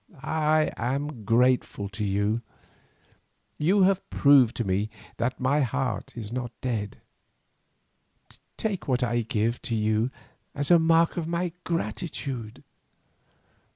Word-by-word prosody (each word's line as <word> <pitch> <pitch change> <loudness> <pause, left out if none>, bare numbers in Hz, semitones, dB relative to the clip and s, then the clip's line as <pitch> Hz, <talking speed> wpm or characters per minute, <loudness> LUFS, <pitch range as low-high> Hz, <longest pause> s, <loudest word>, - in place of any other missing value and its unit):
I 155 0 +2
am 135 -1 -3
grateful 120 -2 +2
to 105 +2 -5
you, 100 +3 0 1.2
who 190 +6 +4
have 195 0 +2
proved 140 -5 +5
to 120 - -1
me 100 +2 0 0.3
that 120 +2 -1
my 135 +3 +2
heart 130 -5 -2
is 110 -2 -6
not 125 -2 -3
dead, 110 -5 -3 1.6
take 210 -4 -2
what 130 -1 +1
I 120 -1 +1
give 115 +1 -1
you 110 +1 +1 0.5
as 145 +3 0
a 170 - +8
mark 165 +1 +3
of 165 -2 -2
my 170 +1 -1
gratitude." 130 -6 -4
125 Hz, 120 wpm, -26 LUFS, 110-155 Hz, 1.6 s, a